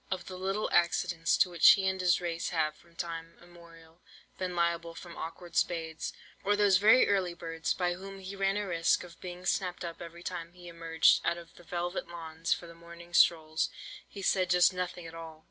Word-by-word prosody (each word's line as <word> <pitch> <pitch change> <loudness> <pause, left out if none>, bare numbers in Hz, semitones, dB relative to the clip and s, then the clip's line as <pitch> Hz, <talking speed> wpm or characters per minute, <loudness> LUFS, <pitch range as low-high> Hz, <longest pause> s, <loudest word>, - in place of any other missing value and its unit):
"Of 185 -2 -3
the 185 - -7
little 195 +3 -1
accidents 170 -1 +2
to 180 - +3
which 170 -2 +8
he 195 -1 0
and 190 0 -1
his 180 -1 +3
race 170 -1 -3
have 155 -3 0
from 170 -1 -23
time 165 -1 -6
immemorial 170 -1 -17 0.4
been 180 -1 -3
liable 170 -1 0
from 170 -1 -10
awkward 170 +1 -8
spades, 165 -2 -1 0.3
or 205 +1 +3
those 205 -2 +5
very 220 +6 +6
early 190 -4 +1
birds, 165 -1 -3
by 180 -1 0
whom 195 +2 -9
he 195 +1 -8
ran 195 0 +1
a 210 - -1
risk 170 -2 +1
of 170 -1 -14
being 180 0 -8
snapped 180 -2 -1
up 170 -1 -7
every 170 0 -9
time 170 -2 -5
he 180 -1 -13
emerged 165 -1 +3
out 170 - 0
of 170 -1 -12
the - - -16
velvet 175 +1 -3
lawns 165 -1 -6
for - - +1
the 170 - -11
morning 170 +1 -13
strolls, 160 -2 +3 0.4
he 200 - -9
said 185 -2 +2
just 180 0 +5
nothing 180 -1 -4
at 165 - -9
all. 165 -1 -9
175 Hz, 205 wpm, -30 LUFS, 165-185 Hz, 0.4 s, which